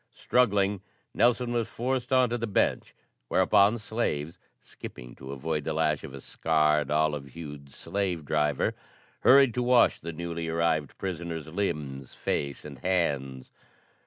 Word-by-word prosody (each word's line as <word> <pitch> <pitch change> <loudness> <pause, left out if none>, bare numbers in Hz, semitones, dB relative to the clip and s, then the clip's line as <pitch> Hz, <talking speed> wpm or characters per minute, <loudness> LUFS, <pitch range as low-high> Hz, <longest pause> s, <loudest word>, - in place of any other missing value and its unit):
Struggling, 100 -5 +2 0.3
Nelson 120 +1 +2
was 115 -2 0
forced 125 +2 -2
on 130 -2 +4
to 120 - 0
the 115 - -2
bench, 100 - 0 0.3
whereupon 100 - +4
slaves, 90 -9 -3 0.2
skipping - - -10
to 65 0 -9
avoid 75 +2 -3
the - - -2
lash 75 -2 0
of 80 - -8
a - - -8
scarred, 75 -1 +1
olive 75 -2 0
hued 75 -3 -9
slave 90 -2 -3
driver, 75 -2 +1 0.5
hurried 135 -2 +6
to 125 - -1
wash 125 -1 +4
the 85 - -6
newly 85 0 -4
arrived 80 -3 0
prisoner's 85 -4 -4
limbs, 75 -8 -3
face 70 0 -3
and 70 -3 -9
hands. 70 -8 -1
80 Hz, 140 wpm, -28 LUFS, 75-105 Hz, 0.5 s, hurried